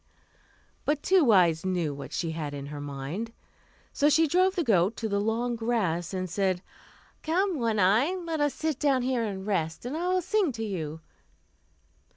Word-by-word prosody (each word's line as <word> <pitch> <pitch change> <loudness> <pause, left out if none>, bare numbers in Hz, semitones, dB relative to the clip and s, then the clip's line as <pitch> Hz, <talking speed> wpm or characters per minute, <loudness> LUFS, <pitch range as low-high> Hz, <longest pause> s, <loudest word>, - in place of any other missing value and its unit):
But 295 0 0
Two 360 -10 +4
Eyes 170 -5 +4
knew 175 -5 -1
what 140 - -8
she 165 -2 -2
had 150 -3 -4
in 140 -1 -6
her 145 - -6
mind. 145 +11 -5 0.6
So 290 - +3
she 320 +2 +4
drove 370 +5 +2
the 350 - +1
goat 200 - +3
into 225 -1 -4
the 200 -1 0
long 235 +3 0
grass, 215 -8 -1
and 185 -1 -3
said, 185 0 -1 0.6
"Come, 355 +1 0
One 230 -2 0
Eye, 220 - +3
let 335 -3 -3
us 290 -1 +1
sit 315 -4 -2
down 275 -4 +2
here 250 -2 0
and 195 -3 -4
rest, 165 -3 -2
and 255 +5 -3
I 345 +3 -2
will 365 0 +1
sing 405 -4 +1
to 225 -1 -4
you." 160 -6 -4
225 Hz, 185 wpm, -28 LUFS, 175-295 Hz, 0.6 s, Two